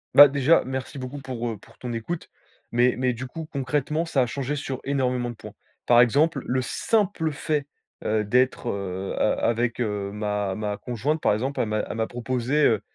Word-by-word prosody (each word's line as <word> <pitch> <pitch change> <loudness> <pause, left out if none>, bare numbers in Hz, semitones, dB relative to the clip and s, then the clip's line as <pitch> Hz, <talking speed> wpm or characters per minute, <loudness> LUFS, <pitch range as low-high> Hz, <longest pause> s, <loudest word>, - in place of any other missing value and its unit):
Bah, 145 +1 +12
déjà, 140 +3 +3
merci 130 +1 -4
beaucoup 130 +2 -6
pour 125 -3 -4
heu, 110 - -4
pour 100 - -19
ton 120 -2 -5
écoute. 160 +9 -4 0.4
Mais 120 +1 +4
mais 125 0 +1
du 125 +2 -6
coup 160 +4 -7
concrètement 150 +2 -1
ça 145 -5 +1
a - - +3
changé 135 +4 -3
sur 135 -2 -4
énormément 125 -3 0
de 120 - -7
points. 105 -1 -11 0.3
Par 120 0 +7
exemple, 140 +4 +3
le 130 +1 0
simple 180 - 0
fait, 150 -1 -1 0.4
heu, 110 0 +1
d'être, 125 +3 +2
heu, 95 -2 -3
a 105 - +2
avec, 120 +1 0
heu, 105 -4 -2
ma 105 -1 -2
ma 105 0 -2
conjointe, 125 +8 -2
par - - +3
exemple, 130 +6 -1
elle 115 - 0
m'a 110 0 0
elle - - -4
m'a 110 0 0
proposé, 125 +4 0
heu, 110 -3 +3
125 Hz, 200 wpm, -25 LUFS, 110-140 Hz, 0.4 s, Bah